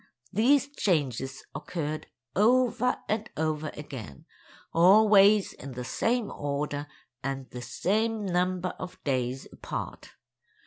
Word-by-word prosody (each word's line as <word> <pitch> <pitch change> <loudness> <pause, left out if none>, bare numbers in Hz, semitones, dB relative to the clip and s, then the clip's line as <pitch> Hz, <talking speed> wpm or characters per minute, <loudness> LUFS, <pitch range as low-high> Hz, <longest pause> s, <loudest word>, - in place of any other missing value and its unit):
These 265 +7 +4
changes 135 - -1
occurred 155 -3 -4 0.3
over 245 +3 +3
and 215 0 -1
over 155 0 -1
again—always 190 - +3
in 135 0 -9
the 125 0 -5
same 230 - 0
order, 145 0 -3 0.3
and 135 -1 -4
the 125 - -6
same 215 - 0
number 180 0 0
of 180 - -7
days 130 -1 -1
apart. - - -6
175 Hz, 100 wpm, -28 LUFS, 140-215 Hz, 0.3 s, These